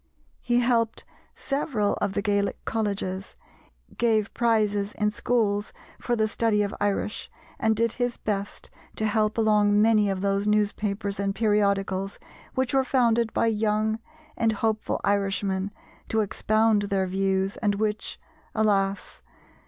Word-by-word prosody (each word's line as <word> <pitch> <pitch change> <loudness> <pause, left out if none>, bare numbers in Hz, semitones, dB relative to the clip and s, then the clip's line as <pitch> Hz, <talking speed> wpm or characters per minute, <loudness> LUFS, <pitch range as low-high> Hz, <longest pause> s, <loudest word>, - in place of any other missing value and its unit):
He 240 0 +2
helped 235 -2 +1 0.3
several 275 -7 0
of 205 -2 0
the 200 - -1
Gaelic 205 -1 0
Colleges, 200 -3 -3 0.6
gave 220 -3 +2
prizes 210 -3 +1
in 210 0 0
schools 215 -3 0 0.3
for 240 - -1
the 220 -1 +1
study 215 -1 +1
of 200 - -3
Irish, 205 +1 -1 0.3
and 220 0 +2
did 230 +1 +1
his 245 0 -2
best 205 -1 -4 0.2
to 220 - -1
help 215 0 +1
along 210 -2 +3
many 215 -1 +4
of 190 -1 -2
those 200 +1 0
newspapers 205 -1 0
and 200 0 -1
periodicals 200 -3 +1 0.4
which 260 0 0
were 270 -1 +4
founded 235 -3 +2
by - - +1
young 220 0 +1 0.4
and 225 -1 +1
hopeful 215 0 -1
Irishmen 195 -1 0 0.4
to 220 - +2
expound 215 +1 +2
their 195 -1 +1
views 190 +1 0
and 205 -2 0
which 210 +1 -2 0.4
alas! 200 -3 0
210 Hz, 135 wpm, -26 LUFS, 200-225 Hz, 0.6 s, many